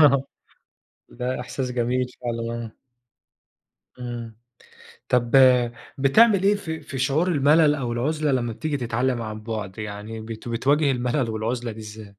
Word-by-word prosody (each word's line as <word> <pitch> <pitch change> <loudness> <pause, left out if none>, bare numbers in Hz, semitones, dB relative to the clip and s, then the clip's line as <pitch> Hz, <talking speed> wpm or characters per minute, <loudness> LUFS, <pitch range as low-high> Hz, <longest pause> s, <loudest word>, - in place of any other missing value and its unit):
آه 140 -3 +6 0.9
ده 125 +1 -3
إحساس 125 +1 -4
جميل 125 +1 0
فعلًا 115 -1 -3
آه. 110 - -9 1.3
إمم، 120 -2 -6 0.7
طَب 120 -1 +2 0.7
بتعمل 195 +9 +5
إيه 200 +1 +4
في 160 -5 -5
في 145 -2 -7
شعور 140 +6 +1
الملل 150 -1 +4
أو 125 -5 -3
العُزلة 150 +4 0
لما 120 -3 0
بتيجي 150 +4 -2
تتعلم 120 0 -1
عن 110 -1 -6
بُعد، 105 -4 -5
يعني 105 +1 -6
بت 110 +1 -8
بتواجه 140 +5 +2
المَلل 125 0 0
والعُزلة 115 +2 -2
دي 110 - -10
إزاي؟ 105 -1 -10
125 Hz, 140 wpm, -24 LUFS, 115-140 Hz, 1.3 s, آه